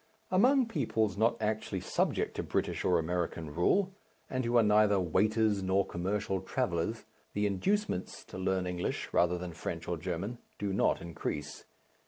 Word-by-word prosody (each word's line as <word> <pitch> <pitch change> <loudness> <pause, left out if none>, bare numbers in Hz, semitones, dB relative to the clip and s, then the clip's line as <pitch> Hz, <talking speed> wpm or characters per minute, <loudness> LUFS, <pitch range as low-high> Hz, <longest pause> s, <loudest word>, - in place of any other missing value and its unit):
Among 255 +8 +5
peoples 110 - 0
not 115 +3 +2
actually 110 0 -1
subject - - 0
to - - -1
British - - -1
or 90 - +3
American 85 -2 -2
rule, 190 - +2 0.4
and 130 0 0
who 120 +1 +2
are 115 - +6
neither 105 -1 +4
waiters 105 +4 +2
nor 95 +1 +2
commercial 95 +1 -2
travellers, 85 +9 -1 0.3
the 105 0 +1
inducements 100 - -1
to 95 - -9
learn 95 -1 0
English, 90 -1 -2
rather 90 0 +3
than 90 -1 -6
French 80 +1 -5
or 85 - -1
German, 95 +8 -4 0.2
do 100 -1 -2
not 95 - +2
increase. 75 -3 -5
95 Hz, 155 wpm, -31 LUFS, 90-110 Hz, 0.4 s, are